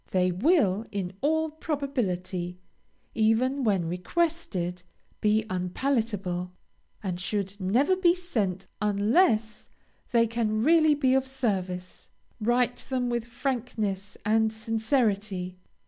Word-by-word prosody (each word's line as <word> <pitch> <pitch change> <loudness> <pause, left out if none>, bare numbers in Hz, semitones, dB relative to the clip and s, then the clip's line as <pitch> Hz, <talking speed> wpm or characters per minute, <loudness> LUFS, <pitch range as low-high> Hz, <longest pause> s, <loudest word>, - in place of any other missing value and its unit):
They 185 -1 +2
will, 215 - +2
in 195 -3 -3
all 315 +2 +1
probability, 200 - -2 0.6
even 240 +5 +2
when 195 -7 +2
requested, 180 - -1 0.4
be 215 +1 +3
unpalatable, 185 -2 -1 0.5
and 180 -3 -3
should 195 +1 -2
never 245 - +3
be 355 -2 +4
sent 210 - -2 0.2
unless 215 - +2 0.4
they 235 -2 +4
can 220 -1 0
really 315 0 +5
be 265 -3 +2
of 265 0 +2
service. 190 -9 -3 0.3
Write 240 +2 +2
them 250 -2 0
with 235 -1 -1
frankness 230 -5 -3
and 220 +1 +3
sincerity. 215 -5 -1
220 Hz, 105 wpm, -27 LUFS, 190-265 Hz, 0.6 s, really